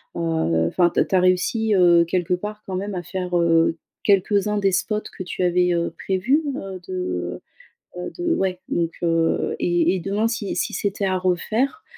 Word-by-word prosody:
heu, 160 - 0
enfin, 175 - +2
tu - - +1
as - - +3
tu - - -1
as 185 - +5
réussi, 205 +4 +2
heu, 175 -2 +5
quelque 180 +1 0
part 210 +3 -7
quand 190 - -3
même 200 +2 -3
à 180 - -3
faire, 180 0 -4
heu, 165 -1 +3 0.3
quelques-uns 205 +1 +2
des 195 -1 +2
spots 210 +3 0 0.2
que 185 - -4
tu 180 - -5
avais, 180 0 +2
heu, 170 0 0
prévus? 240 +12 +1
Heu, 190 -1 -6
de, 90 - -3 0.6
heu - - -4
heu, - - -5
de 345 -1 0
ouais. 185 - -1
Donc 170 -1 0
heu 165 -1 +1
et 175 +1 +2
et - - -2
demain 205 +5 0
si 225 -4 -3
si - - -1
c'était 200 0 -1
à 185 -1 +1
refaire, 220 - 0
185 Hz, 195 wpm, -22 LUFS, 175-205 Hz, 0.6 s, as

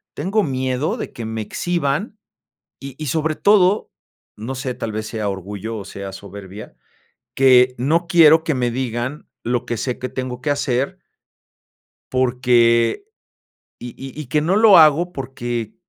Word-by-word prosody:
tengo 195 +7 0
miedo 130 -1 -1
de - - -6
que 115 - -6
me 110 0 -4
exhiban, 175 - -2 0.6
y 135 -1 -9
y 155 - -6
sobre 155 +3 0
todo, 200 +1 +3 0.5
no 115 +5 -5
sé, 130 0 -4
tal 115 -2 -4
vez, 110 0 -3
sea 110 -2 -3
orgullo 100 +3 -6
o 100 - -7
sea 100 0 -7
soberbia, 100 +1 -10 0.6
que 125 -1 +5
no 160 +8 +1
quiero 165 -3 +6
que 155 - +1
me 125 -2 0
digan, 125 +3 -4 0.2
lo 120 0 -1
que 120 - -3
sé 125 +3 -3
que 130 - -3
tengo 130 -1 -5
que 145 - 0
hacer. 140 -1 -1 1.1
Porque, 120 - +2 0.7
y 120 - -7
y 135 +2 -9
y 150 - -7
que 150 +5 +1
no 170 +6 +1
lo 215 -4 +7
hago 160 +3 +5
porque, 120 -5 -5
130 Hz, 155 wpm, -20 LUFS, 115-155 Hz, 1.1 s, lo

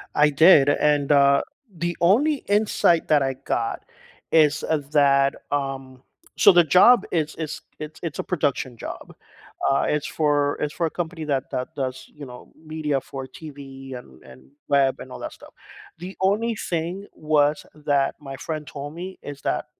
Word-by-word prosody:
I 150 0 +5
did 145 -1 +6
and, 145 0 +2
uh, 140 -1 +5 0.3
the 175 +1 -3
only 250 - +4
insight 205 -5 +2
that 150 -3 +3
I 135 0 -1
got 120 -3 -3 0.5
is, 150 -2 +3
uh, 160 - 0
that, 140 -2 +3 0.2
um 135 -2 -4 0.3
so 200 - +7
the 175 -1 +6
job 185 - +5
is 155 -2 -1
is 155 -2 -5 0.2
it's 155 0 -8
it's 165 -4 -5
a - - -1
production 140 -7 -2
job, - - -9 0.6
uh, 135 - +2
it's 150 0 -1
for 145 -2 0
it's 150 0 -2
for 170 - -1
a - - -4
company 165 -1 -5
that 135 -3 -2
that 125 - -4
does, 130 -1 -5
you 145 -1 -9
know, 125 -1 -12
media 155 -3 -3
for 135 0 -8
TV 135 -2 -10
and 65 - -15
and 65 0 -16 0.2
web 135 -2 +3
and - - -10
all - - -8
that - - -6
stuff, - - -16 0.5
the 185 +2 -8
only 215 +4 +1
thing 175 +1 -4
was 150 -1 +1
that 145 -2 0
my 135 -2 -8
friend 155 0 -5
told 145 +3 -8
me 185 +2 -8
is 145 -1 -9
that - - -1
150 Hz, 175 wpm, -23 LUFS, 135-165 Hz, 0.6 s, so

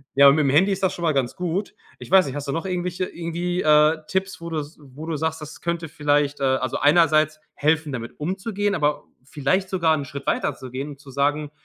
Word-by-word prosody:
ja, 140 0 +8
aber 140 - +7
mit'm 140 -3 +2
Handy 190 +8 +4
ist 195 - -2
das 190 - +2
schon 175 - -7
mal 160 -2 +2
ganz 130 -3 -1
gut. 180 +2 -3 0.2
Ich - - -10
weiß 190 -1 +7
nicht, 130 - -5
hast 145 0 -5
du - - +1
noch 165 +3 -3
irgendwelche, 180 0 -2
irgendwie, 175 +1 -3
äh, 155 +1 +5
Tipps, 190 -2 -2
wo 170 - -6
du 160 - -3
s 150 +2 -8
wo 140 +3 -10
du 160 - -2
sagst, 160 +1 -2
das 150 +1 -10
könnte 170 -1 -2
vielleicht, 145 -1 0
also, 130 -1 0
einerseits 155 0 +4 0.2
helfen, 155 0 +1
damit 115 -2 -7
umzugehen, 195 +5 -2
aber 150 -3 0 0.2
vielleicht 150 +8 -1
sogar 165 -4 +2
'n 145 - -4
Schritt 140 +1 -8
weiterzugehen 130 +2 -2
und 140 - -12
zu 140 -2 -13
sagen, 145 +2 0
155 Hz, 220 wpm, -23 LUFS, 145-175 Hz, 0.2 s, ja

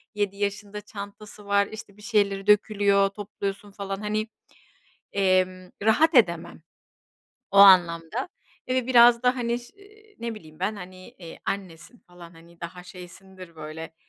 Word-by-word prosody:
7 205 -1 -2
yaşında, 205 0 -4
çantası 205 0 -10
var, 200 0 +2
işte, 215 -2 -11
bir - - -16
şeyleri 205 -3 0
dökülüyor, 200 -1 +3
topluyorsun 200 0 -6
falan, 195 -1 -5
hani, 215 +1 -2 0.9
emm, 185 -1 +1
rahat 300 +10 +3
edemem. 170 -9 +2 0.9
O 200 - -3
anlamda, 185 - +5 0.4
eee, 255 - 0
ve 255 - 0
biraz 240 -1 +6
da, 250 +1 +2
hani, 235 -1 -1
ş 240 0 -16
ııı, 400 - -17 0.3
ne 235 -1 -4
bileyim 155 -7 -14
ben, 205 +3 -1
hani, 185 0 -11
eee, 170 -3 -12
annesin 190 +3 -6
falan, 175 -3 -15
hani, 170 0 -19
daha 175 +1 -8
şeysindir 185 0 -13
böyle. 160 +1 -8
200 Hz, 145 wpm, -25 LUFS, 180-215 Hz, 0.9 s, biraz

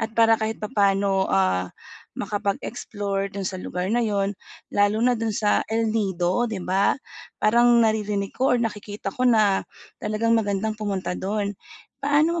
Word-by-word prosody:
at 225 0 -3
para 225 -1 +5
kahit 220 0 -1
papaano, 200 -3 +1
ah, 95 -1 +1 0.5
makapag-explore 200 -1 -3
do'n 200 -1 -4
sa 185 0 -4
lugar 180 +1 -3
na 240 - +2
'yon 200 -2 0 0.4
lalo 205 +1 +3
na 250 - +4
do'n 225 0 -2
sa 210 0 +2
El 225 0 0
Nido, 195 +1 0
'di 220 - -4
ba? 190 +7 +2 0.4
Parang 235 +3 +4 0.2
naririnig 210 -2 -1
ko 260 0 +3
or - - -1
nakikita 210 -3 -4
ko 255 - -1
na, 215 -4 +4 0.4
talagang 215 +2 0
magandang 210 0 0
pumunta 200 -4 -2
do'n. 200 +2 -2 0.5
Paano 305 +4 +2
210 Hz, 150 wpm, -24 LUFS, 195-225 Hz, 0.5 s, para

